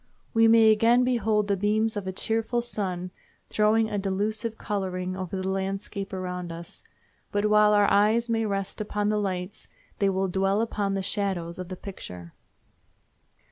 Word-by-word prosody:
We 225 -1 +5
may 225 -1 +7
again 230 +3 +4
behold 220 -4 +1
the 200 - +2
beams 215 +3 +1
of 205 -2 -4
a - - -1
cheerful 225 +4 -1
sun 185 -6 -3 0.4
throwing 215 +1 +3
a 210 -2 -2
delusive 215 +4 -1
coloring 185 -3 -3
over 190 0 -4
the 185 - -3
landscape 195 +1 -3
around 180 -2 -4
us, 170 0 -9 0.5
but 205 +1 0
while 210 0 +5
our 205 0 +5
eyes 220 +4 +3
may 225 -1 0
rest 195 +1 -3
upon 210 0 -1
the 210 0 +1
lights 190 0 -4 0.3
they 200 - +3
will 190 0 0
dwell 195 +2 +1
upon 205 -3 -1
the 195 - -2
shadows 185 -4 -2
of 185 -1 -6
the 185 - -5
picture. 90 - -9
200 Hz, 165 wpm, -26 LUFS, 190-215 Hz, 0.5 s, may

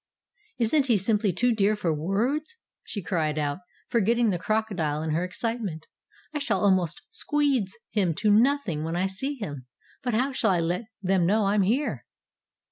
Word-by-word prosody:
"Isn't 265 +5 +2
he 235 -4 +4
simply 205 +1 +1
too 240 +7 +2
dear 210 0 +2
for 175 -6 0
words?" 235 - -1 0.3
she 205 - -6
cried 155 -4 -1
out, 145 +1 -1 0.3
forgetting 235 0 +2
the 175 - -1
crocodile 180 -8 -1
in 160 - -2
her 165 +3 +1
excitement. 190 -4 -3 0.5
"I 295 - -1
shall 220 -10 0
almost 185 -5 +2
squeedge 285 - 0 0.2
him 185 -7 +1
to 210 +3 +2
nothing 225 - +2
when 165 +1 -2
I 180 +2 +1
see 265 +10 -2
him. 145 - -7 0.3
But 245 -3 -1
how 260 +5 +1
shall 245 -4 +1
I 180 -3 +3
let 175 +6 -1 0.2
them 185 -2 +2
know 210 +2 +3
I'm 200 +1 +3
here?" 235 +10 0
205 Hz, 170 wpm, -26 LUFS, 175-235 Hz, 0.5 s, he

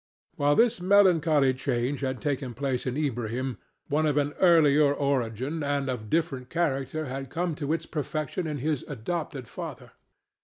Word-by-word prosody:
While 145 +1 +3
this 230 -5 +3
melancholy 165 -8 +4
change 130 +1 -1
had 130 -2 -3
taken 135 -4 -2
place 130 0 -2
in 130 +2 -2
Ilbrahim, 125 -3 -2 0.3
one 155 +2 +1
of 150 -1 +1
an 145 0 +1
earlier 155 -5 +5
origin 140 +1 -1
and 140 -1 -1
of 110 -4 -6
different 145 -6 -1
character 155 -2 -1
had 135 0 -5
come 170 +2 -1
to 145 +1 -1
its 165 - -1
perfection 155 +3 -3
in 150 -2 -3
his 150 0 -1
adopted 145 0 -4
father. - - -8
145 Hz, 155 wpm, -27 LUFS, 130-155 Hz, 0.3 s, earlier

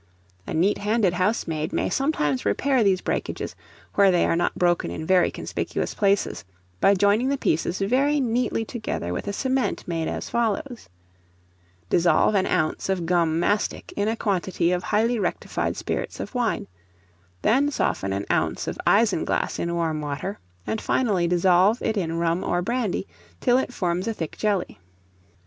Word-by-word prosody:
A - - -4
neat 185 +6 +2
handed 210 -3 +1
housemaid 180 -5 -1
may - - 0
sometimes 175 - 0
repair 255 - +2
these 190 -2 +2
breakages, - - -3 0.4
where 200 -1 +5
they 180 -2 +3
are - - +2
not 175 +1 0
broken 175 - +2
in 85 - -5
very 185 0 +4
conspicuous - - -3
places, 200 - +1 0.4
by 200 - +5
joining 205 +6 +3
the 280 - +1
pieces 170 - 0
very 270 +9 +2
neatly 240 -2 0
together 215 - -4
with 90 - -4
a - - 0
cement 260 +5 -1
made 165 -2 -2
as - - -4
follows: 235 +2 -2 1.0
Dissolve 170 - +3
an 190 -2 +2
ounce 155 +4 0
of 185 -3 0
gum 165 -2 +2
mastic 205 +4 -1
in 205 +1 0
a 225 - +1
quantity 190 -5 0
of 180 0 0
highly 225 +5 +1
rectified 180 -4 -2
spirits - - -3
of - - -6
wine; 245 -3 0 0.8
then 275 +5 +3
soften 95 - -1
an 100 +1 -2
ounce - - 0
of - - -4
isinglass 210 -4 +2
in 170 - -1
warm 160 -2 -1
water, 150 +7 -4 0.3
and, 220 - -2
finally, 200 -9 +1
dissolve 180 +5 +4
it 220 - 0
in 170 -5 -1
rum 170 +1 0
or 175 0 0
brandy, 235 -3 -1 0.3
till 250 0 +3
it 265 - -3
forms 180 -3 -1
a 225 - -1
thick 160 -5 -5
jelly. 205 -4 -1
195 Hz, 165 wpm, -24 LUFS, 170-225 Hz, 1.0 s, where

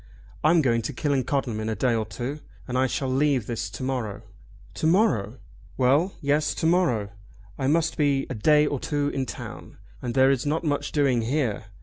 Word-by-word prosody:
I'm 160 +1 +4
going 115 -3 +2
to 110 - -4
Killancodlem 135 -4 -1
in 110 0 -3
a 110 - -1
day 125 0 +1
or 110 -2 -1
two, 135 +5 -5 0.3
and 125 - -4
I 130 +1 +3
shall 135 +1 -2
leave 135 -2 +1
this 115 0 -3
to - - -7
morrow!" 125 -6 -3 0.5
"To 160 - -1
morrow!" 135 - +2 0.4
"Well; 140 +9 +2
yes; 150 +1 +1
to - - -2
morrow. 145 - +2 0.5
I 130 - 0
must 165 +3 +1
be 140 -3 +2
a - - -4
day 150 +7 +4
or 145 -2 -1
two 145 +1 -1
in 135 -2 -3
town, - - -8 0.2
and 120 0 -4
there 135 0 +5
is 135 -3 0
not 155 +3 -1
much 145 -3 -1
doing 135 -5 +2
here. 120 -3 -1
135 Hz, 195 wpm, -25 LUFS, 120-150 Hz, 0.5 s, there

